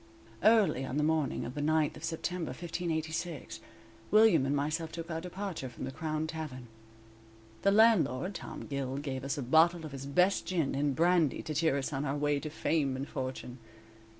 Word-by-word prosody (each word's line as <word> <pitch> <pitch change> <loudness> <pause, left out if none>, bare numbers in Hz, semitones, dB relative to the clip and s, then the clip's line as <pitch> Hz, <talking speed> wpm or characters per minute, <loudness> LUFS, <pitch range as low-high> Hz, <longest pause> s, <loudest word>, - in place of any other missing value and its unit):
"_ - - -26 0.4
Early 210 - +4
on 130 +1 -3
the 150 - +2
morning 155 -3 0
of 125 - -6
the 145 - -4
9th 155 0 +2
of - - -11
September, 170 0 -3
1586, 165 -2 -4 0.5
William 210 -10 +5
and 140 - +1
myself 155 +3 -1
took 170 0 -6
our 160 0 -3
departure 180 -5 -5
from 120 - -9
the 130 - -4
Crown 155 +2 -2
Tavern. 155 -6 -6 1.0
The 200 - +4
landlord, 200 - +4
Tom - - -7
Gill, 135 -2 -3
gave 135 -2 -4
us 140 +3 -2
a 140 - -2
bottle 160 +5 +4
of 155 - -7
his 135 0 -7
best 180 +5 +2
gin 165 -6 0
and 140 0 0
brandy 170 -2 +2
to 155 - -4
cheer 155 -2 +2
us 140 +3 -3
on 135 +1 -1
our 145 0 -1
way 145 0 +1
to 155 - -5
fame 150 -3 0
and 135 +2 -4
fortune. 130 -2 -5
155 Hz, 190 wpm, -31 LUFS, 140-170 Hz, 1.0 s, William